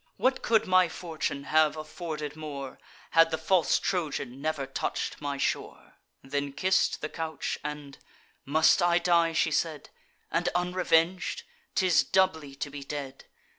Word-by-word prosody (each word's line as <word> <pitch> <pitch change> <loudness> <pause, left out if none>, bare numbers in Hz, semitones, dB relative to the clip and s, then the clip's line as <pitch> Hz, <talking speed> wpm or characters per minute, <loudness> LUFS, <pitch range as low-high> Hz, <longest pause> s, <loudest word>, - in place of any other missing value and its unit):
What 260 0 +1
could 225 -2 +3
my 185 -1 +4
fortune 160 -5 -4
have 155 +1 +3
afforded 155 -2 -5
more, 145 -4 -7 0.3
Had 165 0 +6
the 160 - -1
false 170 +2 +2
Trojan 145 -7 -2
never 155 -2 -1
touch'd 135 - -3
my 145 -1 -3
shore!" - - -3 0.3
Then 140 +1 -3
kiss'd 185 +6 +1
the 155 - -2
couch; 160 -2 -4
and, 145 -1 -6 0.4
"Must 160 +6 +4
I 175 0 +4
die," 170 -2 +3
she 160 0 +2
said, 155 0 -2 0.4
"And 175 +1 +1
unreveng'd? 180 0 +1 0.3
'Tis 180 -6 +4
doubly 160 -5 +1
to 145 +1 -5
be 140 0 -7
dead! 140 -1 -6
155 Hz, 140 wpm, -28 LUFS, 145-175 Hz, 0.4 s, Had